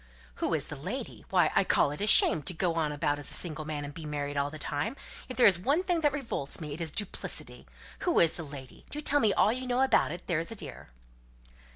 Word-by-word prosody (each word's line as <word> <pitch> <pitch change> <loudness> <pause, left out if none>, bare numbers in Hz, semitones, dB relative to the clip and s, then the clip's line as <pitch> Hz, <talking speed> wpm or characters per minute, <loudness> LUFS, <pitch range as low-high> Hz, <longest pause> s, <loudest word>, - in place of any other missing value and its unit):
"Who - - 0
is - - -1
the - - -8
lady? - - -6
Why, - - +3
I - - +4
call - - +2
it 150 - -6
a 205 - 0
shame 160 - +7
to 170 +5 -5
go 175 0 0
about 150 -2 -1
as 145 - -5
a - - -1
single 155 -3 -2
man, 150 -1 -4
and 145 - -8
be 155 0 -8
married 145 -1 -3
all 140 0 0
the 155 - -9
time! 150 - -3 0.3
If 255 - -7
there 250 - +6
is 185 -4 +6
one 285 - +1
thing 355 -3 0
that 295 -2 +3
revolts 255 - -3
me, 150 -3 -6
it 160 - -6
is 160 -2 -2
duplicity. 205 +4 -3 0.3
Who 350 - +2
is 165 - +4
the - - -7
lady? 140 -3 -11
Do 295 - -5
tell 290 -1 +1
me 220 -6 +3
all 210 - +3
you 255 +1 -6
know 250 +1 +1
about 265 - +3
it, 175 +2 -7
there's 165 -2 -1
a - - -5
dear." 150 - -8
165 Hz, 250 wpm, -29 LUFS, 145-230 Hz, 0.3 s, shame